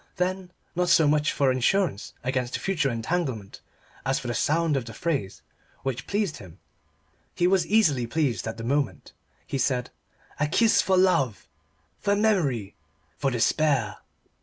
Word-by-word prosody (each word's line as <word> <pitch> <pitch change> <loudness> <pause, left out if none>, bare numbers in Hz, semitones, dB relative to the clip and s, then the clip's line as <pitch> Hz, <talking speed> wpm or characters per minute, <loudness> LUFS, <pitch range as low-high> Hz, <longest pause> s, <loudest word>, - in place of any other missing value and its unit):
Then 185 0 -2 0.3
not 180 0 +1
so 160 - +5
much 150 +1 +2
for 140 -3 +2
insurance 130 - 0
against 125 -1 -1
future 165 -8 0
entanglement 115 - -3 0.4
as 135 +1 +1
for 125 - -5
the - - -1
sound 160 +4 +1
of 130 -4 -1
the 115 -2 -9
phrase, 140 - -2 0.4
which 130 -2 -3
pleased 200 -5 -1
him 90 -3 -13 0.8
he 175 - +1
was 180 -2 +3
easily 155 - +3
pleased 125 -6 -1
at 115 0 -4
the 115 - -6
moment 140 +4 -1 0.3
he 135 - -3
said 125 -1 0 0.5
"A 150 - +2
kiss 220 +8 +4
for 190 -1 +2
love 140 - +2 0.5
for 200 -1 +1
memory 155 - +1 0.5
for 140 - +1
despair!" 130 0 +1
145 Hz, 150 wpm, -26 LUFS, 120-180 Hz, 0.8 s, so